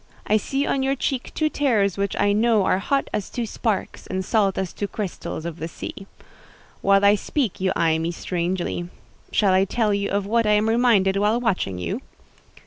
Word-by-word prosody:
I 215 - +3
see 270 +6 -1
on 275 - 0
your 270 +1 +1
cheek 260 -1 -2
two 310 - +2
tears 225 - +1
which 200 0 -1
I 205 - +3
know 220 -2 +3
are 185 - +2
hot 275 +7 0
as 205 - -2
two 240 -2 -3
sparks, 215 -1 -3
and 190 0 -3
salt 200 -3 +2
as 190 -2 -2
two 205 - -3
crystals 195 -5 -5
of 170 -1 -5
the 160 - -3
sea. 195 +3 -8 0.7
While 200 0 +4
I 200 - +7
speak 215 0 -2
you 185 0 +2
eye 160 -1 +2
me 165 +1 -1
strangely. 175 0 -3 0.4
Shall 200 -3 +3
I 190 +1 +4
tell 210 +1 0
you 200 0 -1
of 200 0 0
what 230 +2 +1
I 210 - +4
am 210 +1 +3
reminded 225 -5 +3
while 210 +4 +2
watching 190 - -1
you?" 90 -2 -3
200 Hz, 200 wpm, -23 LUFS, 185-230 Hz, 0.7 s, I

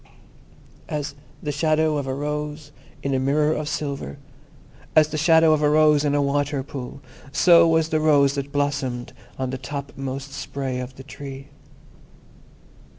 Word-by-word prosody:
As 145 -1 -3 0.3
the 150 - -1
shadow 155 +1 +2
of 140 -2 -2
a 130 - -1
rose 150 +1 -4 0.3
in 140 - -1
a 130 - +2
mirror 150 +3 +2
of 150 -1 -3
silver, 140 - -4 0.8
as 155 -1 +6
the 155 - -3
shadow 160 0 +5
of 155 - +1
a 150 - +4
rose 150 -1 +4
in 145 -1 +1
a 145 - +3
water 140 0 0
pool, 135 -1 -8 0.3
so 170 +2 +6
was 160 -1 +2
the 155 - +1
rose 145 -3 +4
that 140 0 -4
blossomed 140 -4 -2 0.2
on 130 -1 -2
the 130 - -4
topmost 135 0 -6
spray 135 -2 -4
of 125 0 -6
the 135 - -11
Tree. 135 0 -9
145 Hz, 155 wpm, -23 LUFS, 135-155 Hz, 0.8 s, as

